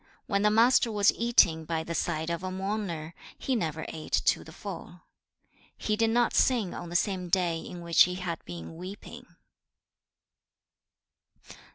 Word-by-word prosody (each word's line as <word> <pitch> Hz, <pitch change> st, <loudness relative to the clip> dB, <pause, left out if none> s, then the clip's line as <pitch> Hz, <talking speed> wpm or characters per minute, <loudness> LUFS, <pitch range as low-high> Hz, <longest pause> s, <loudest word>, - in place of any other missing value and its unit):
When 200 Hz, -1 st, 0 dB
the 210 Hz, -, +4 dB
Master 230 Hz, +2 st, +4 dB
was 205 Hz, -1 st, +4 dB
eating 185 Hz, -9 st, +3 dB
by 160 Hz, 0 st, -2 dB
the 170 Hz, -, -5 dB
side 160 Hz, -1 st, -1 dB
of 170 Hz, -, -3 dB
a 185 Hz, -, -4 dB
mourner, 185 Hz, -4 st, -4 dB, 0.2 s
he 265 Hz, -, -1 dB
never 160 Hz, -7 st, -2 dB
ate 155 Hz, -1 st, -1 dB
to -, -, +2 dB
the 160 Hz, -, -12 dB
full. 180 Hz, -1 st, -8 dB, 0.5 s
2. -, -, -35 dB, 0.2 s
He 215 Hz, -, -1 dB
did 225 Hz, +1 st, +2 dB
not 240 Hz, +1 st, +2 dB
sing 230 Hz, -8 st, +2 dB
on 175 Hz, -, -7 dB
the 175 Hz, -, -7 dB
same 185 Hz, -1 st, 0 dB
day 175 Hz, -2 st, +1 dB
in 175 Hz, +1 st, -8 dB
which 170 Hz, -1 st, +5 dB
he 180 Hz, 0 st, -4 dB
had 180 Hz, -3 st, -4 dB
been 85 Hz, -, -8 dB
weeping. 185 Hz, +4 st, -9 dB
180 Hz, 165 wpm, -28 LUFS, 165-210 Hz, 0.5 s, which